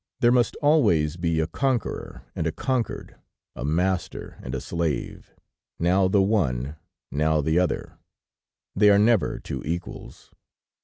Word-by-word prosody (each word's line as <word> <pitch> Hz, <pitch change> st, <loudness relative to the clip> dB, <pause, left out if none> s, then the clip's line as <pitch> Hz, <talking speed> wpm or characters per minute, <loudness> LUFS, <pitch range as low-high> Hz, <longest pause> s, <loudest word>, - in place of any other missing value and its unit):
There 120 Hz, -2 st, +4 dB
must 125 Hz, -1 st, +2 dB
always 105 Hz, -, +3 dB
be 85 Hz, -2 st, 0 dB
a 80 Hz, -, +2 dB
conqueror 130 Hz, -, -2 dB
and 80 Hz, -, -1 dB
a -, -, 0 dB
conquered, 130 Hz, -, -3 dB, 0.4 s
a -, -, -6 dB
master 90 Hz, +5 st, -2 dB
and 60 Hz, -, -5 dB
a -, -, -2 dB
slave; 85 Hz, -4 st, -3 dB, 0.5 s
now 95 Hz, +3 st, +3 dB
the 95 Hz, +1 st, +3 dB
one, 75 Hz, -, 0 dB, 0.4 s
now 75 Hz, +2 st, +1 dB
the 80 Hz, +3 st, +2 dB
other 90 Hz, -2 st, -2 dB, 0.8 s
they 105 Hz, +1 st, +5 dB
are 100 Hz, -, +6 dB
never 110 Hz, 0 st, +3 dB
two -, -, -6 dB
equals. 85 Hz, +3 st, -6 dB
90 Hz, 140 wpm, -25 LUFS, 80-105 Hz, 0.8 s, are